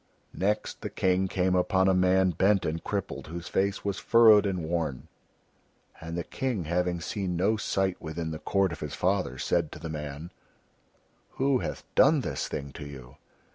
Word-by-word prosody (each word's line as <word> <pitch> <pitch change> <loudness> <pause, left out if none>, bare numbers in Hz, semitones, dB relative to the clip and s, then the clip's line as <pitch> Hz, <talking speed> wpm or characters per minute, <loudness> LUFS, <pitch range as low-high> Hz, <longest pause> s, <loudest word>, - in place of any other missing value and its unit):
Next 105 +3 -1
the - - -4
King 95 0 +1
came 90 0 0
upon 95 +1 +2
a 95 - +4
man 95 0 +3
bent 95 +4 +2
and 80 +1 -2
crippled, 100 -1 -4
whose 85 +2 -7
face 100 +2 -1
was 100 -2 -1
furrowed 110 -3 +6
and 90 -3 -2
worn, 80 -4 -2 0.9
and 85 +1 -5
the 85 - -2
King 130 -9 -2
having 85 +2 0
seen 90 +1 -3
no 100 +6 +2
such 110 - -5
sight 95 -1 0
within 80 0 -4
the 80 - -5
court 95 0 +1
of 80 - -6
his 75 -1 -5
father 90 -8 0
said - - 0
to - - -8
the 80 - -7
man: 75 +1 -6 1.1
"Who 135 -1 +2
hath - - -5
done - - +5
this - - -3
thing 70 0 -5
to 75 - -9
you?" 65 -2 -11
90 Hz, 180 wpm, -28 LUFS, 80-100 Hz, 1.1 s, furrowed